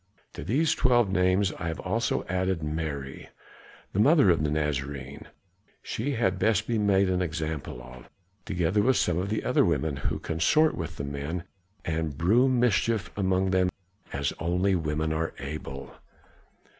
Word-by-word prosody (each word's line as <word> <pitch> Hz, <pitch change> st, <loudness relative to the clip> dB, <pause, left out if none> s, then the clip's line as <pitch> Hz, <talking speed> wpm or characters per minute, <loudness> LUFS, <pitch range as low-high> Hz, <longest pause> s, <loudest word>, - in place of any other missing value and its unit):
To -, -, -7 dB
these 150 Hz, +8 st, +2 dB
twelve 120 Hz, -5 st, +3 dB
names 95 Hz, +1 st, +2 dB
I 80 Hz, -, -3 dB
have 80 Hz, -, -3 dB
also 110 Hz, +5 st, -1 dB
added 90 Hz, -2 st, -1 dB
Mary, 75 Hz, -3 st, -4 dB, 0.6 s
the 95 Hz, -, -1 dB
mother 140 Hz, -, +6 dB
of 80 Hz, -3 st, +1 dB
the 75 Hz, -, +1 dB
Nazarene, 70 Hz, -2 st, -3 dB, 0.6 s
she 140 Hz, +6 st, -2 dB
had 95 Hz, -6 st, 0 dB
best 110 Hz, +1 st, +2 dB
be 115 Hz, -1 st, 0 dB
made 100 Hz, -2 st, +3 dB
an 90 Hz, 0 st, +1 dB
example 80 Hz, -6 st, -4 dB
of, 60 Hz, 0 st, -13 dB, 0.3 s
together 90 Hz, +1 st, +1 dB
with 130 Hz, +4 st, +3 dB
some 90 Hz, -1 st, +1 dB
of 95 Hz, +2 st, -2 dB
the 110 Hz, -, -1 dB
other -, -, +3 dB
women, 80 Hz, -4 st, 0 dB
who 65 Hz, -, -2 dB
consort 150 Hz, -, +2 dB
with 80 Hz, -1 st, -5 dB
the -, -, -5 dB
men 70 Hz, +5 st, -4 dB, 0.4 s
and 80 Hz, -3 st, -2 dB
brew 110 Hz, +11 st, +4 dB
mischief 115 Hz, -4 st, +1 dB
among 95 Hz, -1 st, +1 dB
them 95 Hz, -1 st, +3 dB, 0.4 s
as 70 Hz, 0 st, -1 dB
only 90 Hz, +4 st, +1 dB
women 80 Hz, -2 st, -1 dB
are 80 Hz, +1 st, -2 dB
able." 70 Hz, -1 st, -7 dB
90 Hz, 155 wpm, -27 LUFS, 75-100 Hz, 0.6 s, mother